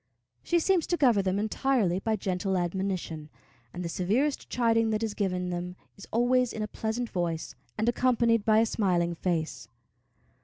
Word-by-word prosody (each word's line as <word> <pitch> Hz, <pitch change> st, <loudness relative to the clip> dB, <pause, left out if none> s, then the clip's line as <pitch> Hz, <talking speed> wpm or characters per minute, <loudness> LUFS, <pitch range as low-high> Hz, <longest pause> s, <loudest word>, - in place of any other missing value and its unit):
She 345 Hz, -, +1 dB
seems 345 Hz, 0 st, +2 dB
to 345 Hz, -, 0 dB
govern 240 Hz, -9 st, +4 dB
them 190 Hz, +1 st, +1 dB
entirely 215 Hz, -3 st, +1 dB
by 220 Hz, +2 st, 0 dB
gentle 190 Hz, -1 st, -1 dB
admonition, 175 Hz, -3 st, -3 dB, 0.4 s
and 175 Hz, 0 st, -6 dB
the -, -, -1 dB
severest 220 Hz, -, 0 dB
chiding 230 Hz, -2 st, +2 dB
that 215 Hz, 0 st, 0 dB
is 220 Hz, -2 st, -2 dB
given 180 Hz, -3 st, -1 dB
them 175 Hz, +1 st, -4 dB, 0.2 s
is 200 Hz, -, -12 dB
always 245 Hz, +1 st, +2 dB
in 215 Hz, -, -3 dB
a -, -, -3 dB
pleasant 220 Hz, +3 st, -3 dB
voice, 170 Hz, -3 st, -2 dB, 0.2 s
and 220 Hz, -, 0 dB
accompanied 235 Hz, -2 st, +2 dB
by 215 Hz, 0 st, +4 dB
a -, -, +3 dB
smiling 180 Hz, -6 st, +1 dB
face. 165 Hz, -2 st, -2 dB
210 Hz, 165 wpm, -28 LUFS, 180-235 Hz, 0.4 s, govern